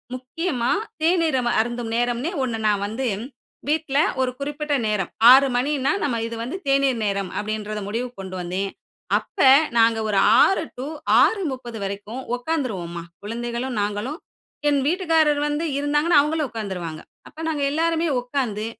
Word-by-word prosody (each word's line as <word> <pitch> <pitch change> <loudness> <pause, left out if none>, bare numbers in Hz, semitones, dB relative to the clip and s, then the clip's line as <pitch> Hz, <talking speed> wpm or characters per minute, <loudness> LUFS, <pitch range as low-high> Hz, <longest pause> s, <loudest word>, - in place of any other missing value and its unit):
முக்கியமா 255 0 -2 0.3
தேநீர் 325 -4 +2
நம்ம 240 -1 0
அம - - +2
அருந்தும் 240 0 -4
நேரம்ன்னே 245 +6 0
ஒண்ணு 235 -3 -2
நான் 205 -1 +1
வந்து 245 +5 -3 0.6
வீட்ல 300 -2 0 0.2
ஒரு 255 -1 +1
குறிப்பிட்ட 290 +1 -3
நேரம். 205 -4 -1 0.2
"6:00 270 +1 +7
மணின்னா, 275 +2 +1
நம்ம 235 -5 0
இது 230 - -6
வந்து 280 +11 -4
தேநீர் 275 -3 +2
நேரம்." 195 -2 -1
அப்படின்றத 215 0 -3
முடிவுக்கு 240 +1 -4
கொண்டு 185 -1 -7
வந்தேன். 185 +3 -2 0.5
அப்ப - - -9 0.4
நாங்க 225 -1 +4
ஒரு 200 - +1 0.2
6:00 385 - +4
டூ 260 +3 -4 0.3
6:30 260 - 0
வரைக்கும் 205 +6 -5
உக்காந்துருவோம்மா. 220 - -3 0.2
குழந்தைகளும், 240 +3 -4
நாங்களும், 210 +9 -3 0.5
என் 285 -1 +2
வீட்டுக்காரரு 320 -4 +2
வந்து 295 +3 -1
இருந்தாங்கன்னா 295 +2 +3
அவுங்களும் 300 -2 -1
உக்காந்துருவாங்க. 180 -8 -5 0.3
அப்ப 320 - -11
நாங்க 305 -3 -1
எல்லாருமே 330 +1 +1
உக்காந்து, 245 -5 -2
250 Hz, 140 wpm, -23 LUFS, 215-295 Hz, 0.6 s, 6:00